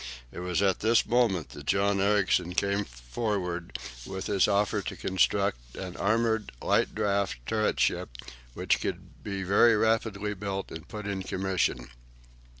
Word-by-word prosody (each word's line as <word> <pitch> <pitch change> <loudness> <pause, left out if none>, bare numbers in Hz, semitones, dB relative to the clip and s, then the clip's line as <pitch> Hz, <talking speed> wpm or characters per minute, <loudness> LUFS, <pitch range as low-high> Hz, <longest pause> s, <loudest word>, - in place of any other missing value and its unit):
It - - -8
was 90 +1 0
at 95 -2 +2
this 115 +2 +3
moment 115 - +2
that 70 0 -11
John 100 0 +2
Ericsson 95 -3 +2
came 100 +1 +1
forward 85 - -3 0.3
with 95 +4 -5
his 100 -2 +3
offer 105 0 +1
to - - -5
construct - - 0
an 90 -1 -6
armoured 110 +1 +1
light - - +1
draught 100 -1 +1
turret 110 - 0
ship, - - +1 0.5
which - - +1
could - - -5
be 100 -1 -3
very 105 +4 +5
rapidly 105 -2 +1
built 100 -1 -4
and 80 -1 -8
put 105 -1 -7
in 100 -2 -2
commission. 95 -10 -1
100 Hz, 150 wpm, -28 LUFS, 90-105 Hz, 0.5 s, very